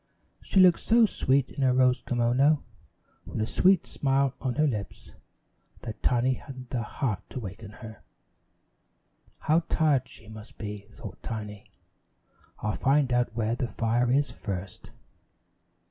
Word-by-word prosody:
She 195 - +1
looked 180 -2 +7
so 230 0 +4
sweet 135 -9 +1
in - - -5
her 130 -1 +4
rose 125 -1 +3
kimono 125 +5 +2 0.6
with - - -6
a 110 - +1
sweet 185 - +3
smile 135 -1 +1
on 130 -2 -2
her 155 - +3
lips, 105 -8 -4 0.7
that 110 -3 -7
Tiny 125 +1 +2
hadn't 130 -2 -10
the 125 - -1
heart 110 -2 -2
to - - -5
waken 105 0 -8 0.2
her. 110 -1 -11 1.4
"How 155 +2 +3
tired 140 -5 +2
she 110 - -14
must 110 0 -11
be," 105 -2 -7
thought 105 -4 -10
Tiny. 105 -2 -6 1.0
"I'll 105 0 0
find 135 -1 +2
out 120 -2 +1
where 115 -1 0
the 120 +1 -2
fire 120 +2 0
is 140 -1 +2
first." 95 -5 -6
125 Hz, 145 wpm, -27 LUFS, 110-135 Hz, 1.4 s, looked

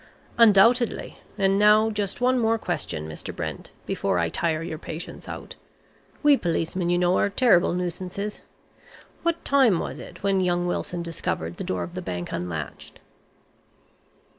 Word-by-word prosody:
"Undoubtedly. 230 +2 +4 0.2
And 195 -1 +2
now 215 +1 +5
just 205 +1 -3
one 255 0 +3
more 225 -1 +2
question, 80 - -4
Mr. 80 - -7
Brent, - - -5 0.2
before - - -1
I 85 -1 +1
tire 160 - -1
your 160 -2 -5
patience 160 +1 -8
out. - - -7 0.7
We 290 -1 +6
policemen, 170 0 -1
you 175 - +3
know, 180 +1 +2
are - - +2
terrible 200 -6 +4
nuisances. 180 +3 -4 0.8
What 335 0 -1
time 265 -9 +4
was - - -4
it - - -11
when 195 -1 +2
young 175 -1 +1
Wilson 175 0 -2
discovered 120 - -3
the - - -4
door 90 -1 -2
of 85 - -8
the - - -4
bank 90 -1 -5
unlatched?" 85 -4 -5
180 Hz, 150 wpm, -25 LUFS, 165-215 Hz, 0.8 s, We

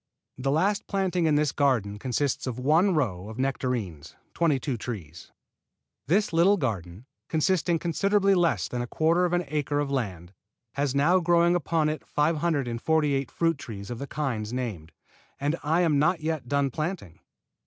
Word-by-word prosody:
The 135 +1 -2
last 190 +8 +1
planting 185 -4 0
in 150 - +3
this 150 -1 +2
garden 110 -8 0
consists 130 +3 -1
of 125 -2 -3
one 160 +9 +3
row 105 - -1
of 110 - -9
nectarines, 125 - -3 0.2
twenty 160 -5 +2
two 135 -1 -2
trees. 95 - -7 0.8
This 195 +4 +2
little 180 +5 +4
garden, 100 - -4 0.2
containing 170 +1 +1
considerably 195 +4 +2
less 175 -3 +2
than 125 - -3
a 120 - -4
quarter 165 +7 +2
of 175 - -1
an 175 -1 +1
acre 145 0 -1
of 145 -1 -1
land, 95 -9 -3 0.4
has 140 -1 -1
now 165 +7 +4
growing 170 0 +3
upon 165 -2 +1
it 155 0 -4
548 150 -2 0
fruit 165 -3 0
trees 100 -4 -8
of 120 - -5
the 140 - -5
kinds 120 -9 -3
named. 110 -11 -4 0.5
And 145 +3 0
I 160 +4 +1
am 155 -5 +3
not 170 +3 +2
yet 155 -5 -3
done 140 0 +1
planting. 155 - -4
145 Hz, 165 wpm, -26 LUFS, 120-170 Hz, 0.8 s, little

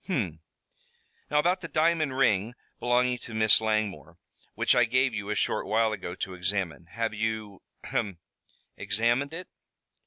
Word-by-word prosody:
"Hum. 100 - -1 0.9
Now 150 - +1
about 175 +5 +3
the 165 - -5
diamond 155 -4 +1
ring 115 -3 +2 0.2
belonging 125 0 +2
to 115 - -9
Miss 110 0 +5
Langmore, 105 -8 -1 0.4
which - - +3
I 120 -1 +5
gave 130 +2 +2
you 105 -2 -4
a 105 - 0
short - - 0
while 110 +1 +2
ago 90 -3 -5
to 95 0 -4
examine? 90 -3 -2
Have 115 0 -1
you 110 -2 -3 0.2
ahem 100 -4 -2 0.6
examined 115 +7 +1
it?" 175 +3 -7
110 Hz, 150 wpm, -28 LUFS, 100-125 Hz, 0.9 s, Miss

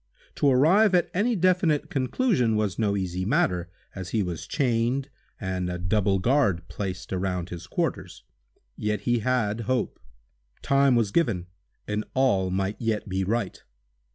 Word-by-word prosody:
To 145 - +3
arrive 180 +10 +5
at 175 - +2
any 225 +6 +1
definite 180 -4 +2
conclusion 135 - +1
was 105 -4 -1
no 100 -2 +1
easy 90 -1 -2
matter, 95 - +1 0.2
as 95 -2 -6
he 105 -1 0
was 85 -3 -5
chained, 130 +2 0 0.3
and 95 -3 -2
a 90 - -3
double 95 +2 +1
guard 100 - +1
placed 90 0 -5
around 90 -1 -2
his 85 -1 -8
quarters. - - -3 0.5
Yet 105 -1 -2
he 120 -1 +1
had 115 -2 0
hope—time - - -1
was 115 -4 +1
given 110 - +1 0.4
and 105 +1 -1
all 100 -9 +2
might 95 +3 -2
yet 110 -3 -1
be 95 0 -1
right. 105 0 -2
105 Hz, 145 wpm, -26 LUFS, 95-130 Hz, 0.5 s, arrive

